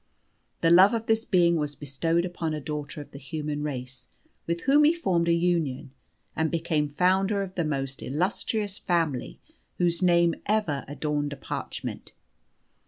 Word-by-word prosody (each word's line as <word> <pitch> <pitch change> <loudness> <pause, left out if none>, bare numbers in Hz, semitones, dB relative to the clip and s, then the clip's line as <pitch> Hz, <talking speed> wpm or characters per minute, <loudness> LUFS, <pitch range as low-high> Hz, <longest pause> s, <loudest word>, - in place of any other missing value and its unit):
The 165 - +4
love 190 +6 +7
of 225 0 -3
this 225 0 +1
being 170 -2 +3
was 150 -2 -2
bestowed 165 +5 -1
upon 165 -3 -3
a - - -3
daughter 150 0 -5
of 145 - -12
the 140 - -10
human 150 +1 -4
race, 130 -3 -5 0.4
with 170 0 -1
whom 285 +3 +5
he 310 +3 +5
formed 175 - +1
a - - +4
union, 170 -6 0 0.4
and 160 0 +1
became 160 -3 0
founder 190 +6 +2
of 190 -1 -7
the 175 - -1
most 135 -3 -3
illustrious 195 - -2
family 165 -8 -1 0.4
whose 170 -1 +1
name 170 -2 +4
ever 200 -10 0
adorned 145 0 -2
a - - -9
parchment. - - -6
165 Hz, 160 wpm, -27 LUFS, 145-185 Hz, 0.4 s, love